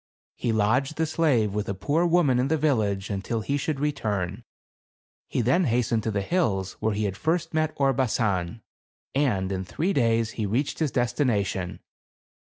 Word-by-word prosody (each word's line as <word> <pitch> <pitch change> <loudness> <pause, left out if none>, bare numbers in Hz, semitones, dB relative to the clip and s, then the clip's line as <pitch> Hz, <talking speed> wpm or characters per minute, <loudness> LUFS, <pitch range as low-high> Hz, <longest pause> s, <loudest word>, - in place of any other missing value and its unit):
He 120 - -1
lodged 125 +7 +1
the 160 - +2
slave 140 -10 +1
with 105 -1 -2
a 100 - -2
poor 145 - +1
woman 165 -8 +3
in 130 - +2
the 160 +3 +1
village, 105 -10 0
until 100 +3 -2
he 140 +6 -1
should 145 0 -2
return. 105 - -2 0.8
He - - -1
then 130 +10 +3
hastened 120 -2 +1
to 110 - -2
the 100 -2 -1
hills 100 - 0
where 110 -1 0
he 105 - -1
had 100 -2 -1
first 165 - -1
met 155 0 +1
Orbasan, 115 -7 0 0.5
and 105 -10 +1
in 95 -1 -2
three 165 - -1
days 115 - +2
he 110 -3 -3
reached 125 +8 -1
his 155 -3 +1
destination. 120 - -1
120 Hz, 165 wpm, -26 LUFS, 100-145 Hz, 0.8 s, woman